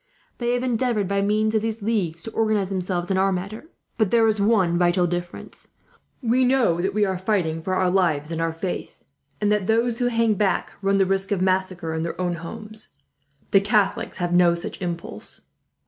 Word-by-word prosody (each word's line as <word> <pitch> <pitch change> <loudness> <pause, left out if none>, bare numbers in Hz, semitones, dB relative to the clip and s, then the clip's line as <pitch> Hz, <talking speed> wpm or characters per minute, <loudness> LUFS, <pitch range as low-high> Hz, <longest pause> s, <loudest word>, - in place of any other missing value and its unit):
They 240 0 0
have 245 - -2
endeavoured, 235 -4 0
by 200 +1 0
means 215 +2 +1
of 220 - +2
these 225 -1 -3
leagues, 190 -7 -1
to 225 - -7
organize 215 -4 0
themselves 180 -1 -2
in 190 - +2
our 195 +1 +3
manner; 195 +8 -4 0.3
but 215 -3 +3
there 230 0 +4
is 215 -2 +1
one 200 -5 +3
vital 175 +1 +3
difference. 175 0 -6 0.6
We 245 +2 +3
know 250 -10 +2
that 195 +2 -1
we 210 -1 +3
are 190 -2 -2
fighting 180 -5 0
for 185 +3 -2
our 185 -1 +2
lives 165 -5 +1
and 165 0 -2
our 165 0 0
faith, 170 +3 -5 0.4
and 210 0 +1
that 210 -3 +1
those 230 +2 +1
who 245 - +2
hang 230 -2 +2
back 200 -2 0
run 195 0 +2
the 195 - +4
risk 195 +1 -1
of 200 - +1
massacre 185 -3 0
in 160 - -2
their 165 +2 -4
own 175 -2 -1
homes. 215 +6 -9 0.6
The 195 - +6
Catholics 205 -1 0
have 175 -1 -1
no 175 -1 +5
such 170 - -7
impulse. 170 -2 -5
195 Hz, 200 wpm, -23 LUFS, 175-215 Hz, 0.6 s, The